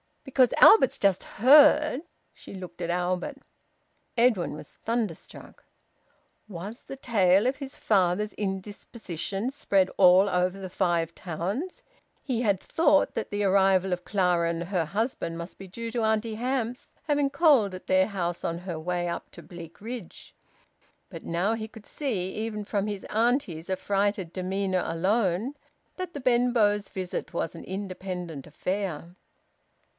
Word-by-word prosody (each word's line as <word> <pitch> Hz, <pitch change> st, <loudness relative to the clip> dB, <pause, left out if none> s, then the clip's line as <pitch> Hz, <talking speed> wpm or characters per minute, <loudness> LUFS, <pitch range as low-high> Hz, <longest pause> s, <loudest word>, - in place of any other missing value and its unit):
"Because 260 Hz, -2 st, +3 dB
Albert's 350 Hz, -, +7 dB
just 195 Hz, -2 st, +2 dB
heard 295 Hz, +3 st, +5 dB, 0.2 s
" -, -, -45 dB
She -, -, -12 dB
looked 180 Hz, -2 st, -9 dB
at 170 Hz, -, -2 dB
Albert. 180 Hz, +10 st, -1 dB, 0.8 s
Edwin 230 Hz, -7 st, +3 dB
was 150 Hz, -, -9 dB
thunderstruck. 225 Hz, -7 st, -4 dB, 0.8 s
Was 200 Hz, +4 st, -8 dB
the -, -, -8 dB
tale 205 Hz, -6 st, +3 dB
of 265 Hz, -, 0 dB
his 275 Hz, -2 st, -7 dB
father's 200 Hz, +1 st, +1 dB
indisposition 200 Hz, +1 st, -4 dB
spread 195 Hz, -9 st, +1 dB
all 185 Hz, +1 st, +7 dB
over 180 Hz, +1 st, 0 dB
the 190 Hz, -1 st, -7 dB
Five 170 Hz, -3 st, 0 dB
Towns? 190 Hz, -, -4 dB, 0.4 s
He 245 Hz, -4 st, -1 dB
had 200 Hz, -5 st, +2 dB
thought 295 Hz, -, +2 dB
that -, -, -3 dB
the 205 Hz, 0 st, -2 dB
arrival 190 Hz, -1 st, +3 dB
of 180 Hz, 0 st, -5 dB
Clara 180 Hz, -4 st, +1 dB
and 170 Hz, 0 st, -2 dB
her 175 Hz, -3 st, -1 dB
husband 200 Hz, -, -2 dB
must 170 Hz, +1 st, -8 dB
be 195 Hz, -, -9 dB
due 230 Hz, +5 st, -6 dB
to 235 Hz, 0 st, -1 dB
Auntie 220 Hz, 0 st, 0 dB
Hamps 245 Hz, 0 st, -3 dB
having 290 Hz, -2 st, +1 dB
called 275 Hz, -, +4 dB
at 185 Hz, -, -11 dB
their 185 Hz, 0 st, +4 dB
house 175 Hz, -4 st, -3 dB
on 170 Hz, 0 st, -2 dB
her 175 Hz, -3 st, -5 dB
way 175 Hz, +1 st, -2 dB
up 170 Hz, -, -5 dB
to -, -, -12 dB
Bleakridge. 180 Hz, +5 st, -9 dB, 0.8 s
But -, -, -9 dB
now 180 Hz, +6 st, 0 dB
he 220 Hz, -1 st, -5 dB
could 220 Hz, -1 st, -14 dB
see, 205 Hz, -11 st, -3 dB
even 215 Hz, -1 st, -4 dB
from 205 Hz, 0 st, -2 dB
his 205 Hz, -2 st, -4 dB
auntie's 220 Hz, -, 0 dB
affrighted 195 Hz, -1 st, -1 dB
demeanour 190 Hz, 0 st, -1 dB
alone, 190 Hz, -, 0 dB, 0.4 s
that 370 Hz, -1 st, -5 dB
the 285 Hz, -, -6 dB
Benbows' 240 Hz, -5 st, +2 dB
visit 185 Hz, -1 st, -5 dB
was 165 Hz, -1 st, -2 dB
an 165 Hz, -, -9 dB
independent 185 Hz, -5 st, -6 dB
affair. 180 Hz, 0 st, -4 dB
195 Hz, 145 wpm, -27 LUFS, 180-230 Hz, 0.8 s, Albert's